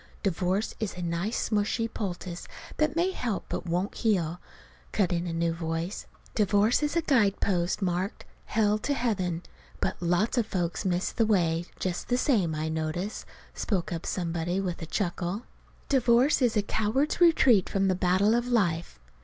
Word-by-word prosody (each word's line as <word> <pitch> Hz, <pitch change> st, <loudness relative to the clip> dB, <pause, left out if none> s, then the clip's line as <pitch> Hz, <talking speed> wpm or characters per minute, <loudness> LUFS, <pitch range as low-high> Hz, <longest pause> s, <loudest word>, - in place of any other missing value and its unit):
"Divorce 190 Hz, +2 st, 0 dB
is 215 Hz, -5 st, -3 dB
a 180 Hz, -, -4 dB
nice 170 Hz, +6 st, -1 dB
smushy 215 Hz, +2 st, +1 dB
poultice 180 Hz, -5 st, -5 dB, 0.3 s
that 305 Hz, -1 st, +1 dB
may 350 Hz, +3 st, +2 dB
help 235 Hz, -, -3 dB
but -, -, -4 dB
won't 180 Hz, +4 st, -1 dB
heal," 180 Hz, -6 st, 0 dB, 0.5 s
cut 185 Hz, -4 st, +1 dB
in 170 Hz, +1 st, -1 dB
a -, -, -2 dB
new 165 Hz, 0 st, 0 dB
voice. 165 Hz, +3 st, -3 dB, 0.3 s
"Divorce 210 Hz, +3 st, +3 dB
is 295 Hz, +1 st, 0 dB
a 335 Hz, -, +2 dB
guidepost 200 Hz, -, +2 dB
marked, 180 Hz, +2 st, -2 dB, 0.2 s
'Hell 215 Hz, -1 st, +2 dB
to 285 Hz, +6 st, -1 dB
Heaven,' 185 Hz, -9 st, -1 dB, 0.4 s
but -, -, -2 dB
lots 180 Hz, +8 st, +2 dB
of 225 Hz, -, 0 dB
folks 175 Hz, -3 st, -2 dB
miss 180 Hz, 0 st, 0 dB
the 225 Hz, -2 st, +1 dB
way, 170 Hz, -5 st, +2 dB
just 180 Hz, -2 st, -3 dB
the 245 Hz, -, +2 dB
same, 205 Hz, -, +2 dB
I 155 Hz, +1 st, -2 dB
notice," 160 Hz, +5 st, -3 dB, 0.3 s
spoke 185 Hz, -5 st, -2 dB
up 165 Hz, -, -5 dB
somebody 175 Hz, 0 st, -1 dB
with 180 Hz, -3 st, -3 dB
a 165 Hz, -, -5 dB
chuckle. 180 Hz, +3 st, -2 dB, 0.4 s
"Divorce 255 Hz, +1 st, +4 dB
is 235 Hz, -3 st, +3 dB
a 205 Hz, -, +2 dB
coward's 230 Hz, -, 0 dB
retreat 265 Hz, -, +5 dB
from 195 Hz, 0 st, +1 dB
the 190 Hz, -, +3 dB
battle 185 Hz, +4 st, +3 dB
of 240 Hz, +1 st, +1 dB
life." 175 Hz, -, 0 dB
195 Hz, 165 wpm, -28 LUFS, 175-225 Hz, 0.5 s, retreat